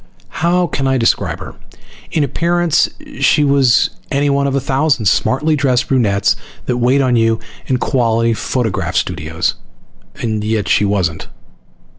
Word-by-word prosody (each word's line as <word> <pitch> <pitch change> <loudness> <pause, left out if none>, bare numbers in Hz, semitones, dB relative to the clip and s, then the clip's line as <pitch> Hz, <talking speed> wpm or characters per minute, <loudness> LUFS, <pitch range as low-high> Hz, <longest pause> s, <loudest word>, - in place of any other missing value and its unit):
How 175 +2 +2
can 135 -5 -2
I 135 0 +2
describe 115 -2 0
her? - - -8 0.6
In 155 - +1
appearance 170 +4 +1 0.3
she 150 - +3
was 135 -4 +3 0.2
anyone 140 0 +1
of 135 - -1
a - - +2
thousand 135 -2 0
smartly 150 - +2
dressed 130 -4 0
brunettes 105 -7 +2 0.3
that 125 - -1
wait 125 +3 +2
on 130 -2 +2
you 115 -1 +2 0.3
in 130 - +1
quality 115 -3 +1
photograph 115 -1 -2
studios, - - -1 0.6
and 110 -2 -3
yet 105 -2 -1
she 105 - +3
wasn't. 95 -6 -1
130 Hz, 140 wpm, -16 LUFS, 115-140 Hz, 0.6 s, she